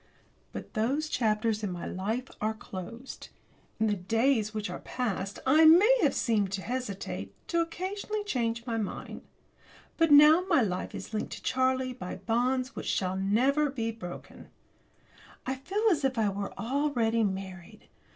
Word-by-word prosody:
But - - -8
those 265 +8 0
chapters 220 -4 0
in 200 - -1
my 175 -1 -5
life 220 +7 -3
are 215 +1 0
closed. 220 +6 -9 0.5
In 220 - +2
the 210 - +2
days 220 +4 +1
which 215 -1 -3
are - - -6
past 200 -5 -3
I 300 +5 +5
may 405 +11 +7
have - - +2
seemed 210 -5 +1
to 195 -1 -3
hesitate, 195 - -4
to 340 - +2
occasionally 385 +5 -3
have - - -9
changed 235 - -1
my 230 -3 -2
mind. 205 - -5 0.8
But 330 -1 +3
now 300 +4 +8
my 325 -8 +4
life 185 -3 -3
is 205 - -8
linked 215 - -3
to - - -9
Charlie's 260 -1 0
by 180 -7 -5
bonds 250 +6 0
which - - -1
never 205 +10 +1
shall 290 - -1
be 230 -4 -2
broken. 180 -6 -10 1.0
I 265 - -1
feel 380 +12 -3
as 305 -5 0
if 265 -2 0
I 215 -2 +2
were 200 0 -4
already 235 -3 +1
married. 190 -3 -5
230 Hz, 160 wpm, -29 LUFS, 205-275 Hz, 1.0 s, now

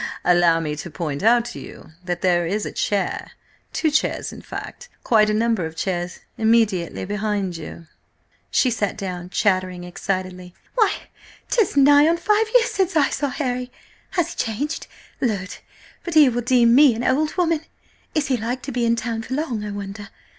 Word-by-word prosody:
"Allow 175 -2 +4
me 150 -2 -3
to 175 - -6
point 150 -2 -4
out 235 +3 +4
to 240 - -7
you - - -12
that 175 -1 -3
there 175 -2 +2
is 205 +4 -1
a - - -4
chair–two 210 - -3
chairs–in 300 - -1
fact, 485 - -8
quite 215 -2 +4
a - - +2
number 225 -3 +1
of 160 0 -5
chairs–immediately 190 +2 0
behind 205 -2 -2
you." 165 +1 -8 0.6
She 255 - +2
sat 210 -4 -1
down, 180 -3 -5
chattering 185 -3 0
excitedly. 185 0 -4 0.2
"Why, 445 -4 +3 0.6
'tis 435 -11 +2
nigh 285 +2 +7
on 335 +1 +3
five 425 +4 +2
years - - +5
since 380 -2 0
I 290 -3 +3
saw 285 - -1
Harry! 250 -2 -3 0.5
Has 350 - +1
he - - -19
changed? 270 +8 -2 0.3
Lud! 200 -6 -2 0.5
but 345 -2 -4
he 300 -4 +8
will 245 0 -1
deem 240 -1 +4
me 270 -2 +6
an 235 - -3
old 295 +5 +1
woman! 335 -3 +2 0.5
Is 305 -2 +2
he 260 -3 +1
like 240 +3 -3
to 275 - -5
be 240 -2 0
in 230 - +3
town 230 -1 -3
for 260 +3 -4
long, 260 -8 -2
I 210 - -4
wonder? 200 0 -7
225 Hz, 175 wpm, -22 LUFS, 185-275 Hz, 0.6 s, he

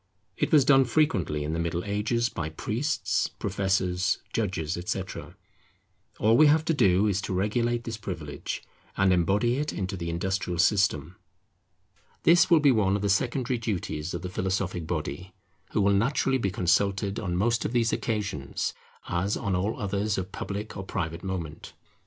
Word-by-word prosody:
It - - -1
was 150 -4 +6
done 135 -2 +6
frequently 115 - +1
in 75 +2 -3
the 80 - -1
Middle 85 +1 -1
Ages 105 +4 0
by 80 -8 -4
priests, 115 - -1
professors, 95 -2 0 0.2
judges, 90 -7 -1
etc. 85 +1 -5 0.8
All 110 +2 +4
we 155 +4 +7
have 155 +1 +4
to 165 - +2
do 100 - +4
is 100 -2 +1
to 95 - -3
regulate 120 +5 0
this 115 -2 -5
privilege, 75 -9 -5 0.3
and 95 -1 +4
embody 100 +8 +2
it 150 +1 -1
into 95 0 -3
the 85 -2 -4
industrial 90 +1 -2
system. 90 -3 +2 1.1
This 175 +1 +5
will 170 -3 +6
be 145 -2 +5
one 100 -5 +2
of 100 - -2
the 100 - +1
secondary 125 +4 0
duties 90 -7 -3
of - - -5
the 90 - -4
philosophic 90 -2 -2
body, 90 +3 -4 0.3
who 105 - 0
will 100 0 +4
naturally 130 +5 +2
be 100 - 0
consulted 100 +3 +1
on 90 -4 -2
most 115 +4 +1
of - - -2
these 115 -2 +1
occasions, 100 - -2 0.3
as 95 +4 0
on 100 -4 -1
all 100 +5 -1
others 100 +1 -1
of 95 0 -4
public 105 +2 -5
or 95 - -5
private 85 -3 -4
moment. 85 -5 -5
100 Hz, 165 wpm, -27 LUFS, 90-115 Hz, 1.1 s, we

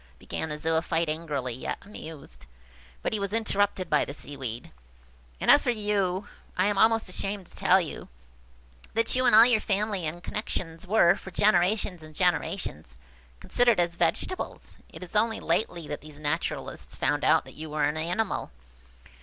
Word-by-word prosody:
began 160 - -5
the 150 - -4
Zoophyte, 165 +1 0
angrily, 150 -6 -2
yet 125 - -4
amused–but 65 - -10
he 215 - 0
was 200 0 -3
interrupted 205 -4 +1
by 150 -2 +3
the 140 - -6
Seaweed– 130 -6 -6 0.7
"And - - +5
as 290 - +7
for 250 - 0
you–I 205 -4 -1
am 205 0 +2
almost 225 0 +4
ashamed 195 +1 -4
to - - -15
tell 185 +1 +5
you–that 60 - -6
you 255 0 +2
and - - +6
all 225 +2 +10
your 240 -3 +4
family 205 -4 -1
and 175 +3 -6
connexions 170 -5 -4
were, 180 -4 +5
for - - -10
generations 185 -1 +2
and 155 0 -13
generations, 175 - -1 0.4
considered 240 -5 +3
as 170 -1 +2
vegetables. 170 - -2
It - - -10
is 180 - -11
only 220 +1 +2
lately 170 -7 -1
that 145 - -4
these 150 -1 -10
naturalists 155 +2 -3
found - - 0
out - - +4
that - - -12
you 155 0 -7
were 150 0 -1
an 150 +1 +1
animal. 180 +7 -1
175 Hz, 160 wpm, -27 LUFS, 150-205 Hz, 0.7 s, all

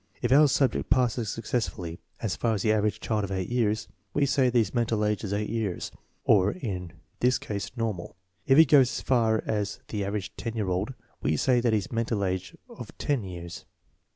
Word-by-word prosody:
If - - -1
our 150 +3 +7
subject 135 -1 +1
passes 120 -3 +2
successfully 105 -7 -3 0.2
as 110 -5 -1
far 115 -2 0
as 100 - -2
the 110 - +3
average 105 -1 0
child 110 -2 0
of 100 - -4
eight 95 -1 -2
years, 110 -3 0 0.3
we 145 - +3
say 135 -2 +3
that 120 - +1
his 110 -5 +2
mental 115 -3 +1
age 105 0 0
is 100 - -3
eight 105 +1 -1
years, 110 -6 -2 0.3
or 100 -1 +4
in 90 - -5 0.3
this 125 +1 +3
case 100 -2 -4
normal. 110 -6 -3 0.3
If 135 0 +5
he 160 - +9
goes 135 -3 +6
as - - -4
far 115 -4 +2
as 105 -2 -2
the 105 -2 -2
average 100 -1 -4
ten 115 -1 -4
year 105 -4 -1
old, 95 +8 -1 0.3
we 75 +1 +1
say 125 - +3
that 120 -1 +1
he - - +4
has 100 - -4
a - - -7
mental 115 -3 0
age 95 -1 -3
of - - -11
ten 140 -6 0
years. 85 -2 -8
110 Hz, 210 wpm, -27 LUFS, 100-120 Hz, 0.3 s, he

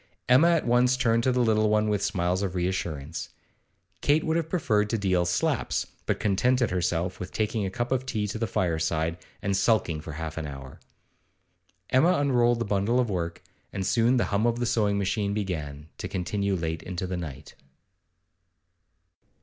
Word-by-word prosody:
Emma 130 +7 +6
at 165 -2 +2
once 125 +1 +3
turned 115 -2 +2
to 130 - +2
the 125 0 +1
little 110 -1 +3
one 105 0 +2
with 105 -2 0
smiles 90 -1 0
of 95 -2 -2
re 90 0 +1
assurance. 80 -4 -4 0.7
Kate 150 +2 +3
would 160 - 0
have 165 -1 -1
preferred 110 - +1
to 115 - 0
deal 95 -4 +1
slaps, 85 0 0 0.2
but - - 0
contented 120 +3 +2
herself 90 0 -1
with 90 0 -6
taking 105 -1 -1
a - - -2
cup 120 +5 -3
of 130 -1 +1
tea 110 -5 -2
to 105 +2 -4
the 115 - 0
fireside, 80 -3 0 0.3
and 100 0 0
sulking 95 -6 +1
for 80 - -8
half 80 0 -5
an 80 - -4
hour. 70 -2 -9 1.1
Emma 160 +8 +5
unrolled 120 -6 +3
the 115 - -2
bundle 105 +4 +1
of 120 -4 +1
work, 85 -2 -3 0.3
and 95 -1 -3
soon 120 +5 +3
the 120 - +2
hum 105 +4 +2
of 120 0 +1
the 120 - -1
sewing 105 -3 +1
machine 100 +1 -1
began, 75 -8 -4
to - - -3
continue 100 +2 -1
late 80 -2 -3
into 90 0 -4
the 90 0 -3
night. 75 -7 -7
100 Hz, 180 wpm, -27 LUFS, 90-120 Hz, 1.1 s, Emma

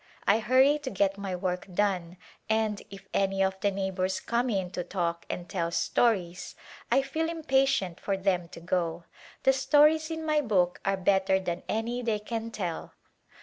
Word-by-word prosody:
I 215 - +4
hurry 260 +6 +4
to 290 -3 -5
get 195 -1 0
my 195 -2 -3
work 180 0 -3
done, 180 -2 0 0.3
and 220 -2 +1
if 195 0 -12
any 195 0 +2
of 190 0 -1
the 205 - +2
neighbors 190 -1 -1
come 240 +2 0
in 190 -5 -1
to 180 - -3
talk 170 -2 -3
and 175 0 -4
tell 170 -2 -1
stories 180 -1 0 0.4
I 270 - +4
feel 320 +4 -2
impatient 270 - +1
for 195 -1 -1
them 185 -3 0
to - - -10
go. 170 -1 -1 0.4
The 265 - +5
stories 300 +4 +4
in 320 -1 -4
my 305 -1 +2
book 185 -8 +1
are 195 0 +1
better 190 0 +2
than 180 -1 -3
any 235 +3 -1
they 225 -3 0
can 225 +2 -4
tell." 180 -7 -5
195 Hz, 175 wpm, -28 LUFS, 180-245 Hz, 0.4 s, The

